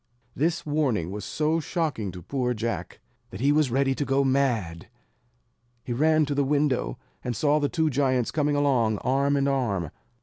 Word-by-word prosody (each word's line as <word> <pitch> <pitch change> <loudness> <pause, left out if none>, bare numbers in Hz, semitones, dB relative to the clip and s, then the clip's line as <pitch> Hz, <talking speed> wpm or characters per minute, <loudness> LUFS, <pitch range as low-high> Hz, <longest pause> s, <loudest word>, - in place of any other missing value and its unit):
This 160 +5 0
warning 135 - 0
was 105 0 -5
so 155 +2 0
shocking 150 - -2
to 90 -1 -10
poor 125 - -1
Jack, 115 +1 -4 0.3
that 95 - -9
he 140 +4 +3
was 150 -2 +3
ready 135 +2 +1
to 145 - -2
go 135 0 +1
mad. 120 -12 0 1.0
He 120 - -3
ran 155 +4 +3
to 145 - -2
the 140 0 +1
window, 140 - 0 0.3
and 125 -1 -3
saw 150 +3 +2
the 145 -1 0
two 160 -2 0
giants 130 -3 +1
coming 150 -1 +1
along 125 -7 +2
arm 140 +2 +2
in 140 0 +1
arm. 105 - -1
135 Hz, 175 wpm, -26 LUFS, 115-145 Hz, 1.0 s, he